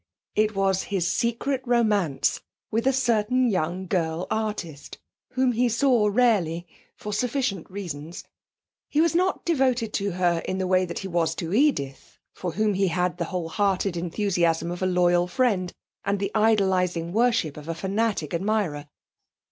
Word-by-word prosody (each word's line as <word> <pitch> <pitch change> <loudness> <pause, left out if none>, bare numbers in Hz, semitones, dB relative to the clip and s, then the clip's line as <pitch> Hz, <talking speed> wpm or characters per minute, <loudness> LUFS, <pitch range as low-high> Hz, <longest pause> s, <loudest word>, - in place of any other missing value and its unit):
It 215 0 +1
was 195 -1 +2
his 190 -4 0
secret 250 +3 -1
romance 215 - +1 0.3
with 230 +4 0
a - - +5
certain 250 -1 +2
young 185 -2 -1
girl 170 -2 -1
artist, 210 -9 -4 0.4
whom 260 -1 +2
he 245 +1 +2
saw 235 -2 +3
rarely, 195 -8 +2 0.3
for 210 - -6
sufficient 240 - -1
reasons. 170 -4 -7 0.7
He 300 - 0
was 330 0 +3
not 365 +2 +1
devoted 255 -8 +1
to 200 -2 -1
her 175 -2 +1
in 185 - -2
the 190 - -1
way 185 0 +3
that 170 - -6
he 195 - -4
was 165 -3 0
to 165 +1 -4
Edith, 210 - 0 0.2
for 180 -3 -5
whom 215 +1 +1
he 195 0 +1
had 180 +1 -1
the 170 - 0
wholehearted 185 +2 -1
enthusiasm 170 -1 0
of 175 - -6
a 185 - +2
loyal 175 -1 +3
friend, 185 -2 +1 0.3
and 200 +1 0
the 200 0 -2
idolising 190 -6 +2
worship 230 - +2
of 150 0 -10
a 165 - -2
fanatic 195 -3 -1
admirer. 175 -6 -1
195 Hz, 155 wpm, -25 LUFS, 175-225 Hz, 0.7 s, a